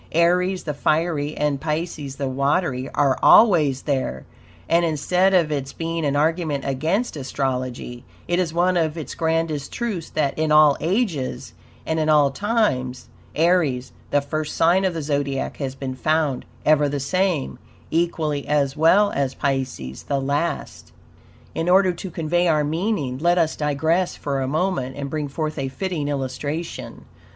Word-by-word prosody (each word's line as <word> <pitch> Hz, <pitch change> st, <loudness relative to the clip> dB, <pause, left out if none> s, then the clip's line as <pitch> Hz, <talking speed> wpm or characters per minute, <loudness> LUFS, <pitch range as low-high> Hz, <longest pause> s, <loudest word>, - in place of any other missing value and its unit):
Aries, 180 Hz, +3 st, +2 dB
the 150 Hz, -, -3 dB
fiery, 155 Hz, 0 st, 0 dB
and 145 Hz, -2 st, 0 dB
PISCES, 155 Hz, -3 st, -3 dB
the 140 Hz, -1 st, -3 dB
watery, 135 Hz, 0 st, 0 dB
ARE 140 Hz, -2 st, +2 dB
ALWAYS 155 Hz, -, +5 dB
THERE, 130 Hz, -, -2 dB, 0.4 s
and, 170 Hz, +1 st, +3 dB
instead 180 Hz, +4 st, +2 dB
of 165 Hz, -4 st, +3 dB
its 140 Hz, -2 st, -3 dB
being 165 Hz, 0 st, -3 dB
an 140 Hz, 0 st, 0 dB
argument 155 Hz, -2 st, 0 dB
against 160 Hz, -, -1 dB
astrology, 130 Hz, -3 st, -3 dB, 0.2 s
it 175 Hz, +1 st, +1 dB
is 175 Hz, -3 st, 0 dB
one 175 Hz, +2 st, +2 dB
of 160 Hz, -1 st, 0 dB
its 155 Hz, -, -6 dB
grandest 160 Hz, -3 st, -1 dB
truths 210 Hz, -9 st, -3 dB
that, 145 Hz, -3 st, -1 dB
in 155 Hz, -1 st, +1 dB
all 150 Hz, -2 st, +6 dB
ages 170 Hz, -, -2 dB, 0.3 s
and 160 Hz, 0 st, -1 dB
in 155 Hz, 0 st, +1 dB
all 150 Hz, -2 st, +5 dB
times, 135 Hz, -, -1 dB, 0.3 s
Aries, 155 Hz, -7 st, +2 dB, 0.2 s
the 145 Hz, -, +2 dB
first 155 Hz, +2 st, -4 dB
sign 180 Hz, +4 st, +3 dB
of 185 Hz, -3 st, 0 dB
the 160 Hz, -, -3 dB
Zodiac 140 Hz, -2 st, -2 dB
has 135 Hz, -2 st, -4 dB
been 135 Hz, -1 st, -5 dB
found 150 Hz, 0 st, 0 dB, 0.2 s
EVER 150 Hz, -1 st, +4 dB
THE 145 Hz, 0 st, -2 dB
SAME, 165 Hz, -, -1 dB, 0.3 s
equally 160 Hz, -3 st, -1 dB
as 145 Hz, -2 st, +1 dB
well 190 Hz, +7 st, +4 dB
as 135 Hz, -1 st, -1 dB
Pisces 130 Hz, -, -3 dB
the 140 Hz, -1 st, 0 dB
last. 140 Hz, +5 st, -3 dB, 0.6 s
In 165 Hz, +2 st, -1 dB
order 185 Hz, 0 st, +5 dB
to 190 Hz, -, -7 dB
convey 175 Hz, +1 st, 0 dB
our 155 Hz, -2 st, +3 dB
meaning, 155 Hz, -, -1 dB
let 175 Hz, +3 st, +2 dB
us 165 Hz, -2 st, +2 dB
digress 160 Hz, +5 st, 0 dB
for 140 Hz, -2 st, -3 dB
a 130 Hz, -, -1 dB
moment 155 Hz, -4 st, -1 dB
and 140 Hz, -1 st, -5 dB
bring 150 Hz, -2 st, -2 dB
forth 155 Hz, +2 st, -4 dB
a 135 Hz, -, -1 dB
fitting 160 Hz, +1 st, -3 dB
illustration. 145 Hz, +4 st, -4 dB
150 Hz, 160 wpm, -22 LUFS, 140-170 Hz, 0.6 s, all